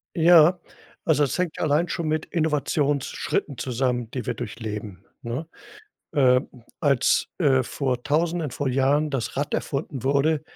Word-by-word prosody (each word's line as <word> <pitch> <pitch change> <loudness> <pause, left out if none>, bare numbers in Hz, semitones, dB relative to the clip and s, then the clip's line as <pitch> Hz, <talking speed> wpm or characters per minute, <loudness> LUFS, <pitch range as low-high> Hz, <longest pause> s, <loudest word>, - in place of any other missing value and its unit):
Ja, 170 +1 +6 0.5
also, 150 -3 +3
das 140 - -1
hängt 180 -3 -2
allein 155 +3 +2
schon 170 -1 -3
mit 155 0 -1
Innovationsschritten 145 -3 -1
zusammen, 125 -1 -1
die 125 - -4
wir - - -1
durchleben, 105 -4 -6 0.2
ne? 125 +7 -4 0.7
Ähm, 130 -2 +3 0.3
als, 140 -4 +2
äh, 135 -6 +3
vor 125 -2 -2
Tausenden 165 +1 0
vor 140 +1 -2
Jahren 140 +4 +2
das 135 -5 -3
Rad 145 +2 -2
erfunden 140 -2 -3
wurde, 145 +3 +2
140 Hz, 135 wpm, -24 LUFS, 125-155 Hz, 0.7 s, Ja